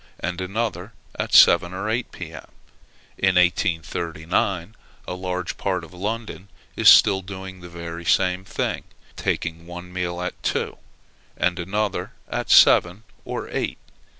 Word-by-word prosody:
and 90 +2 -3
another 100 0 -3 0.3
at - - -2
seven 85 +1 +7
or 95 +3 -3
eight, 115 +2 -1
P.M. - - -9 0.7
In 95 -1 +3
1839, 85 +1 0 0.3
a - - -3
large 90 -1 -4
part 95 -3 -1
of 80 - -12
London 105 +1 -5 0.3
is - - +6
still 95 -1 +7
doing 95 0 -8
the 90 - -10
very 85 0 -7
same 95 +1 +2
thing, 95 - -3 0.3
taking 85 0 -3
one 90 +1 -9
meal 90 -1 -3
at 90 0 -5
two, - - -2 0.6
and 90 0 0
another 100 +3 -2
at - - -4
seven 90 +5 +6 0.2
or - - -4
eight. - - -2
90 Hz, 135 wpm, -23 LUFS, 85-95 Hz, 0.7 s, seven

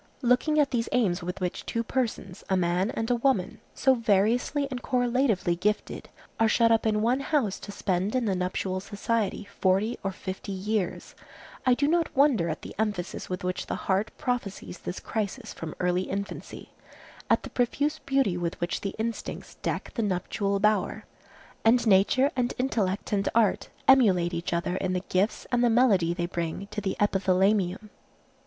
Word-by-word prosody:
Looking 250 +5 +3
at 285 -2 +3
these 230 -3 -1
aims 200 -9 +2
with 180 +2 -5
which 180 -1 -3
two 230 - -2
persons, 225 -7 -3
a 190 - +3
man 180 +3 +1
and 225 -1 -2
a - - +4
woman, 230 -6 0 0.2
so 265 - +4
variously 230 +5 +1
and 250 -1 -4
correlatively 245 -8 +1
gifted, 210 +4 -2 0.3
are 225 - +5
shut 230 +1 +4
up 225 0 +3
in 210 -1 +1
one 245 +4 +2
house 275 -8 0
to 205 - -8
spend 195 +1 -1
in 255 -2 +1
the 200 - +1
nuptial 185 +1 -2
society 205 +1 -2
forty 195 +5 +2
or 195 - -1
fifty 190 +1 -6
years, 195 0 -2 0.5
I 250 - +6
do 285 +3 +1
not 335 +1 +2
wonder 265 - +4
at 155 - -4
the - - -8
emphasis 205 -5 -2
with 185 +1 -4
which 180 0 -3
the - - -2
heart 195 +2 0
prophesies 215 -8 -3
this 180 - -5
crisis 220 +2 -4
from 160 -1 -7
early 180 +1 0
infancy, 200 +1 -6 0.6
at - - +3
the - - -8
profuse 290 +5 0
beauty 270 -10 +1
with 175 -1 -3
which 175 0 -2
the 195 - -4
instincts 225 +1 -4
deck - - -3
the 235 - -1
nuptial 200 0 -1
bower, 210 +1 +1 0.6
and 240 +2 +4
nature 220 +7 +4
and 245 -1 0
intellect 210 -7 -1
and 200 0 +1
art 225 -4 +2 0.2
emulate 190 -10 +5
each 170 +1 -3
other 175 +1 -1
in 185 -1 -1
the 180 0 -1
gifts 195 +4 0
and 245 -1 +2
the 240 - +5
melody 220 -8 +4
they 175 0 -1
bring 170 +2 -3
to 210 0 -3
the 190 -1 -2
epithalamium. 195 0 +1
205 Hz, 175 wpm, -27 LUFS, 185-240 Hz, 0.6 s, I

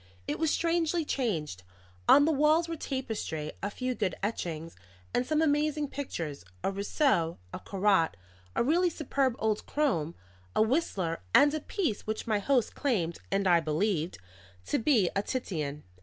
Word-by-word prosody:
It - - -2
was 320 -1 +2
strangely 335 0 +1
changed. 165 - -2 0.5
On 285 - +8
the 320 - +3
walls 310 +3 +3
were 330 - -3
tapestry, 225 - -3
a 200 - -1
few 255 +4 -2
good 205 -6 -1
etchings, 165 -6 -3 0.4
and 250 - +1
some 310 +1 +2
amazing 300 -1 +1
pictures 165 - -5 0.2
a - - +1
Rousseau, 200 - +1 0.2
a - - -4
Corot, 195 - +2 0.4
a - - +2
really 345 +7 +3
superb 275 -5 0
old 215 -1 0
Crome, 170 - 0 0.4
a - - +4
Whistler, 220 - 0
and 290 +1 +7
a 310 - 0
piece 300 - -2
which 215 0 -2
my 215 -2 +1
host 250 +1 +1
claimed 185 - -1
(and 195 0 +1
I 175 -2 +6
believe) 165 +2 0 0.5
to - - 0
be 225 - +3
a 200 - +2
Titian. 155 - -3
220 Hz, 155 wpm, -29 LUFS, -, 0.5 s, On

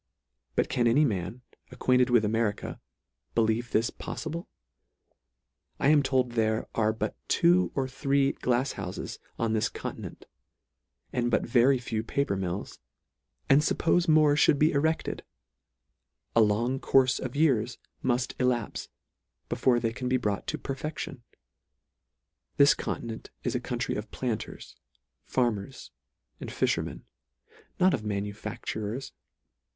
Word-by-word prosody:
But - - +2
can 120 -1 +1
any 145 +7 +5
man, 105 +1 -3 0.3
acquainted 125 0 +2
with 120 -3 +4
Ameri 110 -1 +1
ca, - - -7 0.6
believe 115 +1 +1
this 115 +3 +1
poffible? 170 +3 -6 1.3
I 140 - +3
am 150 -1 +6
told 130 -2 +1
there 110 -1 0
are 110 -1 +2
but 110 -1 -3
two 175 +2 +4
or 135 -1 0
three 140 +1 +1
glafs 125 +2 0
houfes 95 -2 -6 0.2
on 115 -1 0
this 110 - +1
continent, - - -7 0.9
and 120 -1 +1
but 115 - +1
very 125 +3 +4
few 115 -3 -3
paper 140 -1 -1
mills; 95 0 -4 0.7
and 135 +2 +6
fuppofe 170 +2 +2
more 155 -2 +5
fhould 145 0 +4
be 155 +3 +4
erected, 160 +2 0 1.1
a 115 - +6
long 115 +5 +2
courfe 130 -2 +3
of 130 0 -5
years 125 -6 +2 0.2
muff 125 -1 +1
elapfe, 125 -3 0 0.6
before 125 -2 +2
they 115 -1 -1
can 125 +1 -3
be 130 - +3
brought 105 -5 -2
to - - -2
perfection. 135 -1 -5 1.4
This 140 +1 +7
continent 115 -2 -5
is - - -1
a - - 0
country - - -2
of - - -4
planters, - - -4 0.5
farmers, 115 -6 -2 0.5
and - - -6
fim - - +1
ermen; - - -5 0.8
not 185 0 +5
of 110 - -1
manufacturers. 105 +3 -4
125 Hz, 130 wpm, -28 LUFS, 110-135 Hz, 1.4 s, This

